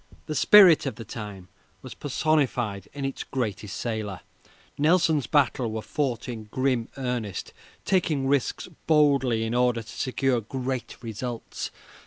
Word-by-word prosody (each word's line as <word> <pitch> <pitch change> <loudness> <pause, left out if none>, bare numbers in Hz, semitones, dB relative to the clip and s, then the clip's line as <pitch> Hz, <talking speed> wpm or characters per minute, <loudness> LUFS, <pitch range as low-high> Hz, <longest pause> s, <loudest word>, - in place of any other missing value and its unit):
The 155 - -4
spirit 180 -3 +7
of 135 - -3
the 115 - -9
time 105 -4 -8 0.4
was - - -8
personified 130 - 0
in 140 -1 -4
its 135 - -3
greatest 105 -6 -3
sailor. 110 -5 -3 0.5
Nelson's 160 - +3
battles 130 -5 +2
were 110 0 -4
fought 130 -6 -2
in 115 -3 -6
grim 125 +1 0
earnest, 125 -7 -3 0.3
taking 160 -7 +1
risks 140 -1 0 0.2
boldly 140 -7 +3
in 115 +1 -2
order 125 -1 +2
to - - -21
secure 130 0 0
great 130 +2 -4
results. 115 +1 -5
125 Hz, 135 wpm, -26 LUFS, 110-140 Hz, 0.5 s, spirit